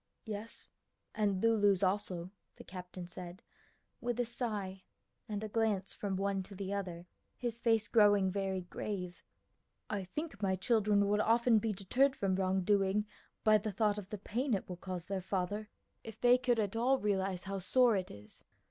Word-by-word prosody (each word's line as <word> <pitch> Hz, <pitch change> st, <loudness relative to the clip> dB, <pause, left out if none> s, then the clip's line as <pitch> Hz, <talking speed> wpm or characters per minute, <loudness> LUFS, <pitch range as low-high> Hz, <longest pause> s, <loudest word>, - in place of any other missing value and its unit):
"Yes; 215 Hz, +1 st, -6 dB, 0.4 s
and 200 Hz, -2 st, 0 dB
Lulu's 205 Hz, -4 st, +4 dB
also," 185 Hz, -2 st, -1 dB, 0.2 s
the -, -, -11 dB
captain 180 Hz, -1 st, -8 dB
said, 180 Hz, 0 st, -8 dB, 0.6 s
with 240 Hz, 0 st, -2 dB
a 245 Hz, -, +2 dB
sigh 210 Hz, -5 st, -3 dB, 0.5 s
and 210 Hz, 0 st, -3 dB
a -, -, -2 dB
glance 210 Hz, -3 st, 0 dB
from 200 Hz, -2 st, -3 dB
one 195 Hz, 0 st, 0 dB
to 195 Hz, +1 st, -10 dB
the 195 Hz, +1 st, -4 dB
other, 180 Hz, -4 st, -4 dB, 0.3 s
his 235 Hz, -1 st, -3 dB
face 225 Hz, -2 st, +2 dB
growing 205 Hz, -4 st, +5 dB
very 190 Hz, -1 st, -1 dB
grave. 180 Hz, 0 st, -5 dB, 0.7 s
"I 205 Hz, -2 st, -1 dB
think 255 Hz, -, -5 dB
my 190 Hz, -2 st, +2 dB
children 205 Hz, 0 st, +3 dB
would 210 Hz, +1 st, +2 dB
often 230 Hz, 0 st, +4 dB
be 220 Hz, +1 st, -1 dB
deterred 250 Hz, +8 st, +2 dB
from 195 Hz, -1 st, 0 dB
wrongdoing 195 Hz, +2 st, +2 dB, 0.4 s
by 215 Hz, -1 st, +6 dB
the 215 Hz, +1 st, -3 dB
thought 210 Hz, +1 st, +1 dB
of 195 Hz, -2 st, -10 dB
the 210 Hz, -, -4 dB
pain 235 Hz, +5 st, -1 dB
it 190 Hz, -, -4 dB
will 180 Hz, -, -6 dB
cause 180 Hz, -1 st, -5 dB
their 195 Hz, 0 st, -3 dB
father, 195 Hz, +3 st, -2 dB, 0.3 s
if 225 Hz, -2 st, -9 dB
they 245 Hz, +1 st, +5 dB
could 250 Hz, -2 st, +2 dB
at 210 Hz, -1 st, 0 dB
all 250 Hz, +4 st, +3 dB
realize 195 Hz, -4 st, 0 dB
how 195 Hz, 0 st, -3 dB
sore 235 Hz, +5 st, +4 dB
it 185 Hz, -2 st, -2 dB
is. 105 Hz, +1 st, -13 dB
200 Hz, 175 wpm, -34 LUFS, 190-220 Hz, 0.7 s, by